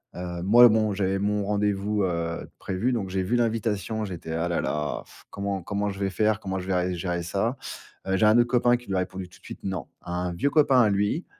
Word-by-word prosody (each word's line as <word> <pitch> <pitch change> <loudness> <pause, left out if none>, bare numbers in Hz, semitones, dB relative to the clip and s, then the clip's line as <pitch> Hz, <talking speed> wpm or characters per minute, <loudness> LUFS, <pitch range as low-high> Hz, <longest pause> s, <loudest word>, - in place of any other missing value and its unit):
Heu, 90 -1 -5
moi, 120 +5 +8
bon, 110 -1 +2
j'avais 95 0 0
mon 105 0 0
rendez-vous, 105 0 0
heu, 85 -2 -2
de - - -13
prévu, 105 +7 -1
donc 100 -5 -2
j'ai 95 0 -1
vu 120 +6 0
l'invitation, 110 -2 0
j'étais: 85 -4 -7
«Ah 85 +1 -1
là 85 - 0
là 75 0 -2 0.3
comment 100 -1 -3
comment 100 +1 -1
je 95 0 -6
vais 100 -1 0
faire? 110 +2 +1
Comment 95 -2 -3
je 90 - -7
vais 90 -1 +1
vais 90 - -2
gérer 85 0 -2
ça?» 110 +9 -1 0.5
heu, 95 - +1
j'ai 110 - +3
un 110 +2 +6
autre 120 0 +4
copain 120 0 +3
qui 120 - -16
lui 95 - -2
a - - +2
répondu 90 0 -4
tout 90 - -19
de - - -34
suite - - -9
non, 95 -7 -3
un 90 0 -3
vieux 140 +11 +1
copain 140 -4 +5
à 110 - +4
lui, 105 - 0
100 Hz, 240 wpm, -26 LUFS, 90-110 Hz, 0.5 s, moi